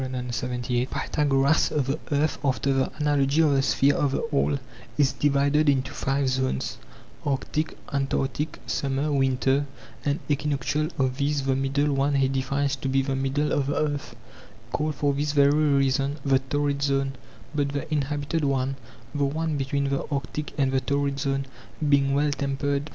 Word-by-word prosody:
Pythagoras: 125 Hz, +3 st, 0 dB
The 140 Hz, +1 st, -1 dB
earth, 145 Hz, +2 st, +1 dB
after 135 Hz, 0 st, +1 dB
the 135 Hz, -1 st, +1 dB
analogy 145 Hz, -1 st, +2 dB
of 150 Hz, -, +4 dB
the 135 Hz, -1 st, +3 dB
sphere 140 Hz, +1 st, +3 dB
of 140 Hz, -2 st, 0 dB
the -, -, 0 dB
all, 140 Hz, 0 st, +2 dB, 0.4 s
is 140 Hz, -2 st, +3 dB
divided 145 Hz, +2 st, +2 dB
into 135 Hz, -1 st, +1 dB
five 135 Hz, -1 st, 0 dB
zones, 130 Hz, -, -1 dB, 0.4 s
arctic, 150 Hz, +2 st, -2 dB, 0.2 s
antarctic, 135 Hz, +1 st, -1 dB
summer, 140 Hz, +2 st, -1 dB
winter, 135 Hz, +1 st, +2 dB, 0.4 s
and 145 Hz, +1 st, 0 dB
equinoctial; 145 Hz, +1 st, 0 dB
of 130 Hz, -1 st, 0 dB
these 145 Hz, 0 st, 0 dB
the 135 Hz, -1 st, +1 dB
middle 140 Hz, +2 st, +1 dB
one 140 Hz, +1 st, +1 dB
he 135 Hz, -1 st, +3 dB
defines 135 Hz, +1 st, 0 dB
to 135 Hz, -, -3 dB
be 135 Hz, 0 st, +2 dB
the 135 Hz, 0 st, -1 dB
middle 135 Hz, +3 st, 0 dB
of 140 Hz, -2 st, +1 dB
the 145 Hz, -, 0 dB
earth, 145 Hz, -2 st, -2 dB, 0.6 s
called 155 Hz, +2 st, -1 dB
for 140 Hz, 0 st, +1 dB
this 145 Hz, +1 st, -1 dB
very 140 Hz, -1 st, +5 dB
reason 140 Hz, -2 st, +2 dB
the 135 Hz, -1 st, +4 dB
torrid 140 Hz, +1 st, -1 dB
zone; 135 Hz, -1 st, +1 dB, 0.4 s
but 145 Hz, -2 st, 0 dB
the 140 Hz, 0 st, -3 dB
inhabited 145 Hz, +2 st, -1 dB
one 135 Hz, -1 st, 0 dB, 0.4 s
[the 145 Hz, -1 st, +1 dB
one 155 Hz, +2 st, -1 dB
between 140 Hz, 0 st, -1 dB
the 140 Hz, -, -1 dB
arctic 145 Hz, +1 st, -3 dB
and 135 Hz, -2 st, +2 dB
the 135 Hz, 0 st, +1 dB
torrid 140 Hz, 0 st, -1 dB
zones] 135 Hz, 0 st, -1 dB, 0.4 s
being 140 Hz, -1 st, +3 dB
well 145 Hz, +1 st, +2 dB
tempered. 140 Hz, +1 st, -1 dB
140 Hz, 160 wpm, -26 LUFS, 135-145 Hz, 0.6 s, very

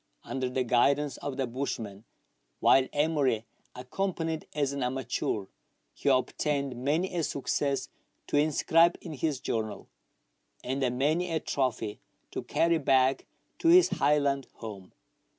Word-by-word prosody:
Under 130 Hz, -1 st, -3 dB
the 130 Hz, 0 st, 0 dB
guidance 140 Hz, +4 st, +2 dB
of 140 Hz, -2 st, -5 dB
the 135 Hz, -, 0 dB
bushman, 115 Hz, -5 st, -5 dB, 0.5 s
while 130 Hz, -1 st, +5 dB
Emery 145 Hz, -7 st, +1 dB, 0.3 s
accompanied 160 Hz, +4 st, -3 dB
as 140 Hz, -2 st, 0 dB
an 140 Hz, -, -3 dB
amateur, 125 Hz, -5 st, -2 dB, 0.5 s
he 145 Hz, -, -1 dB
obtained 140 Hz, +1 st, 0 dB
many 165 Hz, +7 st, 0 dB
a 170 Hz, -, +1 dB
success 140 Hz, -1 st, -1 dB, 0.4 s
to -, -, -3 dB
inscribe 160 Hz, +3 st, +4 dB
in 165 Hz, -, -7 dB
his 150 Hz, -1 st, -1 dB
journal, 110 Hz, -4 st, -3 dB, 0.7 s
and 135 Hz, +2 st, -2 dB, 0.2 s
many 155 Hz, +7 st, +1 dB
a 160 Hz, -, +1 dB
trophy 115 Hz, -8 st, -2 dB, 0.3 s
to -, -, -3 dB
carry 170 Hz, 0 st, +1 dB
back 135 Hz, -1 st, +2 dB, 0.3 s
to -, -, 0 dB
his 355 Hz, +1 st, +7 dB
Highland 140 Hz, -2 st, +1 dB
home. 100 Hz, -5 st, -9 dB
140 Hz, 130 wpm, -29 LUFS, 125-155 Hz, 0.7 s, his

